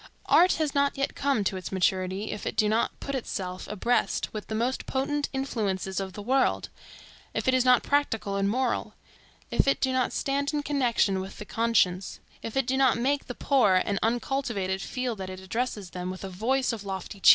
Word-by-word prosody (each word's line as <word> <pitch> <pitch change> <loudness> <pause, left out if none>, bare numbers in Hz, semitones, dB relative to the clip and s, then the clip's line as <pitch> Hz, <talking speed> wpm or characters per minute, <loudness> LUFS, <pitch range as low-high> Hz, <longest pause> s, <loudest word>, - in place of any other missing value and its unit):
Art 360 +1 +6
has 310 -3 -1
not 280 -1 +2
yet 275 - -1
come 275 -6 +1
to 190 -1 -1
its 185 - -6
maturity 190 +2 0
if 210 - -5
it - - -3
do 215 - +3
not 220 +2 0
put 275 - -5
itself 185 -8 -4
abreast 230 +4 0
with 215 -1 -5
the 220 - -3
most 240 +4 -1
potent 285 +2 -1
influences 205 -8 -2
of 190 -1 -4
the 205 - -7
world, 265 +4 +1 0.7
if - - -1
it 260 - +4
is 255 -1 +4
not 250 -1 +5
practical 225 -8 0
and 200 0 +1
moral, 250 +2 -1 0.6
if - - +2
it 275 - +3
do 260 -1 +1
not 255 -2 +1
stand 280 +2 -1
in 295 - -1
connection 240 -9 +2
with 190 - -8
the 210 - -7
conscience, 200 -5 +1 0.2
if 225 +3 -5
it 270 - +2
do 265 +2 0
not 265 -4 +4
make 275 +4 0
the 245 - -5
poor 250 -9 +3
and 200 -1 0
uncultivated 230 -5 -1
feel 250 0 -2
that 190 -2 -6
it 185 0 -7
addresses 205 -1 -3
them 180 0 -4
with 185 +1 -6
a 195 - -4
voice 245 +8 0
of 220 -3 -6
lofty 195 +1 -6
cheer. - - +7
230 Hz, 210 wpm, -27 LUFS, 195-265 Hz, 0.7 s, cheer